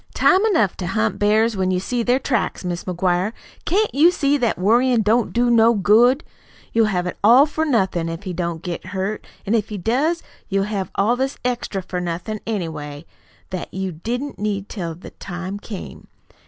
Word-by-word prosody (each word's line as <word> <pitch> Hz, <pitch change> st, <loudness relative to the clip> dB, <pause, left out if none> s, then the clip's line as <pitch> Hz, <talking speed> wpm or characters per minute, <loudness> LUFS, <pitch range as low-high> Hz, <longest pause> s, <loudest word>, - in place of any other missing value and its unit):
"Time 380 Hz, +2 st, +4 dB
enough 225 Hz, -, +2 dB
to 180 Hz, -, -4 dB
hunt 215 Hz, 0 st, 0 dB
bears 215 Hz, +2 st, +3 dB
when 190 Hz, -1 st, 0 dB
you 185 Hz, -1 st, +1 dB
see 240 Hz, +6 st, -2 dB
their 245 Hz, +2 st, +2 dB
tracks. 265 Hz, -7 st, -1 dB
Mis' 175 Hz, -1 st, -3 dB
McGuire, 180 Hz, +3 st, 0 dB, 0.3 s
CAN'T 425 Hz, +4 st, +1 dB
you 305 Hz, +5 st, +6 dB
see 290 Hz, -5 st, +1 dB
that 245 Hz, -5 st, 0 dB
worryin' 235 Hz, +4 st, +3 dB
don't 225 Hz, +3 st, +2 dB
do 240 Hz, 0 st, +2 dB
no 230 Hz, 0 st, +5 dB
good? 235 Hz, -, +4 dB, 0.5 s
You'll 225 Hz, -1 st, +4 dB
have 180 Hz, -4 st, -1 dB
it 180 Hz, -, -5 dB
ALL 245 Hz, +7 st, +7 dB
for 315 Hz, +1 st, -2 dB
nothin', 190 Hz, -, +1 dB
if 165 Hz, +3 st, -6 dB
he 185 Hz, -2 st, -4 dB
don't 170 Hz, -1 st, -3 dB
get 175 Hz, -1 st, -4 dB
hurt; 190 Hz, +2 st, -4 dB, 0.2 s
an' 205 Hz, -, 0 dB
if 220 Hz, -2 st, +1 dB
he 210 Hz, -, -4 dB
does, 275 Hz, -, 0 dB, 0.3 s
you'll 195 Hz, 0 st, +1 dB
have 195 Hz, -3 st, -3 dB
all 215 Hz, +5 st, +2 dB
this 265 Hz, +2 st, -2 dB
extra 240 Hz, -6 st, -2 dB
for 180 Hz, 0 st, -4 dB
nothin', 180 Hz, +5 st, -4 dB
anyway, 160 Hz, -7 st, -4 dB, 0.5 s
that 185 Hz, -2 st, -5 dB
you 190 Hz, 0 st, -3 dB
didn't 245 Hz, -, -4 dB
need 205 Hz, -1 st, -2 dB
till 170 Hz, -6 st, -4 dB
the 175 Hz, -, -11 dB
time 185 Hz, +2 st, -6 dB
came. 205 Hz, -2 st, -9 dB
210 Hz, 190 wpm, -21 LUFS, 185-240 Hz, 0.5 s, ALL